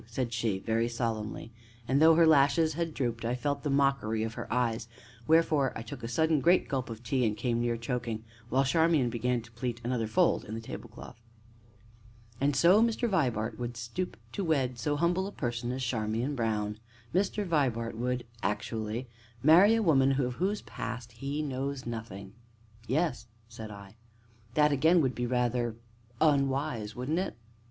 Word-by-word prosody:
said 120 Hz, 0 st, -3 dB
she, 110 Hz, -4 st, 0 dB
very 115 Hz, +4 st, 0 dB
solemnly, 115 Hz, -2 st, -3 dB, 0.4 s
and, 135 Hz, +3 st, +2 dB
though 160 Hz, 0 st, +7 dB
her 165 Hz, 0 st, +6 dB
lashes 155 Hz, +1 st, +4 dB
had 165 Hz, +1 st, -2 dB
drooped, 120 Hz, -5 st, -2 dB
I 120 Hz, +2 st, 0 dB
felt 140 Hz, +3 st, -2 dB
the 150 Hz, -, -2 dB
mockery 135 Hz, -6 st, +1 dB
of 115 Hz, 0 st, -3 dB
her -, -, -7 dB
eyes; 115 Hz, -2 st, 0 dB, 0.4 s
wherefore 155 Hz, -4 st, +3 dB
I 110 Hz, -, -6 dB
took 125 Hz, +2 st, -8 dB
a 115 Hz, -, -4 dB
sudden 160 Hz, +6 st, +2 dB
great 175 Hz, +5 st, +4 dB
gulp 130 Hz, -3 st, -2 dB
of 115 Hz, 0 st, -8 dB
tea, 125 Hz, +2 st, 0 dB
and 105 Hz, -2 st, 0 dB
came 120 Hz, -2 st, 0 dB
near 120 Hz, -1 st, 0 dB
choking, 115 Hz, -2 st, -3 dB, 0.3 s
while 135 Hz, +2 st, +3 dB
Charmian 150 Hz, -2 st, +3 dB
began 120 Hz, +1 st, 0 dB
to 120 Hz, -, -16 dB
pleat 120 Hz, +1 st, -4 dB
another 120 Hz, -2 st, -1 dB
fold 110 Hz, -, +2 dB
in 110 Hz, -, -6 dB
the -, -, -4 dB
tablecloth. 115 Hz, 0 st, -10 dB, 1.2 s
"And 140 Hz, +1 st, +1 dB
so 175 Hz, +9 st, +6 dB
Mr. 235 Hz, +1 st, +1 dB
Vibart 125 Hz, -, 0 dB
would 120 Hz, -1 st, -4 dB
stoop 120 Hz, +11 st, -4 dB
to 200 Hz, -, -3 dB
wed 135 Hz, -7 st, 0 dB
so 145 Hz, +4 st, 0 dB
humble 175 Hz, +5 st, +1 dB
a -, -, -6 dB
person 120 Hz, -6 st, -3 dB
as 130 Hz, +1 st, -3 dB
Charmian 115 Hz, +3 st, -1 dB
Brown? 105 Hz, -4 st, -1 dB, 0.3 s
Mr. 200 Hz, +3 st, +1 dB
Peter -, -, -6 dB
Vibart 125 Hz, -, 0 dB
would, 125 Hz, +1 st, -2 dB, 0.2 s
actually, 110 Hz, +3 st, -3 dB, 0.4 s
marry 180 Hz, +9 st, +7 dB
a 225 Hz, -, +1 dB
woman 135 Hz, -5 st, +4 dB
of 125 Hz, -2 st, 0 dB
whose 200 Hz, +3 st, -1 dB
past 120 Hz, +2 st, -6 dB
he 140 Hz, +6 st, -4 dB
knows 135 Hz, -1 st, -3 dB
nothing?" 115 Hz, -4 st, -6 dB, 0.5 s
"Yes," 135 Hz, -4 st, 0 dB, 0.2 s
said 115 Hz, -1 st, -9 dB
I. 100 Hz, +1 st, -11 dB, 0.6 s
"That, 150 Hz, -1 st, +4 dB
again, 160 Hz, +5 st, +4 dB
would 130 Hz, -3 st, +1 dB
be 120 Hz, 0 st, -2 dB
rather 120 Hz, -1 st, 0 dB, 0.4 s
unwise, 135 Hz, -7 st, +1 dB
wouldn't 140 Hz, +7 st, -1 dB
it?" 190 Hz, -, -3 dB
125 Hz, 175 wpm, -30 LUFS, 115-150 Hz, 1.2 s, though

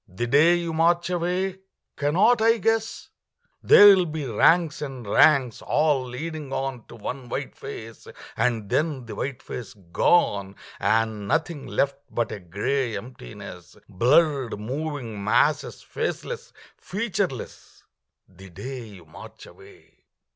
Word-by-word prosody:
The 95 Hz, +7 st, -4 dB
day 150 Hz, +8 st, +5 dB
you 170 Hz, -1 st, -3 dB
march 170 Hz, +2 st, +2 dB
away 180 Hz, +2 st, -1 dB, 0.4 s
cannot 195 Hz, +11 st, +3 dB
I 230 Hz, +1 st, +4 dB
guess? 225 Hz, +1 st, -1 dB, 0.5 s
There 205 Hz, -, +8 dB
will 180 Hz, -2 st, +1 dB
be 155 Hz, -2 st, -4 dB
ranks 160 Hz, +7 st, +3 dB
and 135 Hz, -5 st, -6 dB
ranks, 130 Hz, +2 st, +4 dB
all 150 Hz, -3 st, +1 dB
leading 150 Hz, +3 st, -6 dB
on 135 Hz, -3 st, -4 dB
To -, -, -12 dB
one 125 Hz, +3 st, -6 dB
white -, -, -4 dB
face, 115 Hz, 0 st, -9 dB, 0.3 s
and 115 Hz, -3 st, 0 dB
then 145 Hz, +1 st, -1 dB
the 115 Hz, -, -8 dB
white 135 Hz, -2 st, -5 dB
face 120 Hz, -, -8 dB, 0.2 s
gone, 100 Hz, -, +2 dB, 0.2 s
And 110 Hz, -2 st, 0 dB
nothing 160 Hz, +3 st, -1 dB
left 140 Hz, 0 st, 0 dB
but 120 Hz, -2 st, -2 dB
a -, -, -5 dB
gray 105 Hz, +6 st, -2 dB
emptiness 100 Hz, -, -11 dB
Blurred 130 Hz, -, +2 dB
moving 125 Hz, -3 st, -5 dB
masses, 120 Hz, +8 st, +1 dB
faceless, 485 Hz, -1 st, -5 dB, 0.3 s
featureless 195 Hz, -, -4 dB, 0.4 s
The 95 Hz, +1 st, -15 dB
day 125 Hz, +8 st, -7 dB
you 95 Hz, -5 st, -14 dB
march 80 Hz, -, -13 dB
away. -, -, -18 dB
135 Hz, 130 wpm, -24 LUFS, 115-165 Hz, 0.5 s, There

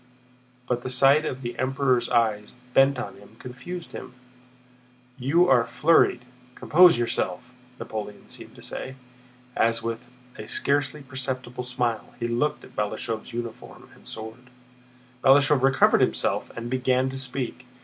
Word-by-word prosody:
but 125 Hz, -1 st, -1 dB
the 130 Hz, -, -5 dB
sight 135 Hz, +4 st, +4 dB
of 130 Hz, -2 st, -4 dB
the 120 Hz, 0 st, -4 dB
Emperor's 130 Hz, -2 st, +1 dB
eyes 110 Hz, -3 st, +1 dB, 0.2 s
bent 135 Hz, +1 st, +5 dB
on 120 Hz, -, -6 dB
him 100 Hz, +2 st, -17 dB
confused 130 Hz, +9 st, -8 dB
him. 130 Hz, -1 st, -9 dB, 1.0 s
"You 160 Hz, +8 st, +3 dB
are 120 Hz, -5 st, +4 dB
flurried—compose 125 Hz, +2 st, +3 dB
yourself!" 120 Hz, -1 st, -2 dB, 0.2 s
Napoleon 105 Hz, -1 st, -7 dB
seemed -, -, -9 dB
to -, -, -13 dB
say, 130 Hz, -, -6 dB, 0.6 s
as 115 Hz, 0 st, +1 dB
with 115 Hz, +2 st, -5 dB, 0.3 s
a 110 Hz, -, -7 dB
scarcely 145 Hz, +3 st, 0 dB
perceptible 130 Hz, -2 st, -4 dB
smile 125 Hz, -3 st, -2 dB
he 120 Hz, -, -1 dB
looked 120 Hz, +6 st, -1 dB
at -, -, -15 dB
Balashëv's 110 Hz, +1 st, -3 dB
uniform 115 Hz, -1 st, -8 dB
and -, -, -17 dB
sword. 110 Hz, +3 st, -9 dB, 0.7 s
Balashëv 140 Hz, +1 st, +5 dB
recovered 135 Hz, 0 st, +4 dB
himself -, -, 0 dB
and 115 Hz, 0 st, -5 dB
began 130 Hz, +1 st, +1 dB
to 135 Hz, -, -6 dB
speak. 125 Hz, -1 st, -5 dB
125 Hz, 135 wpm, -25 LUFS, 120-135 Hz, 1.0 s, bent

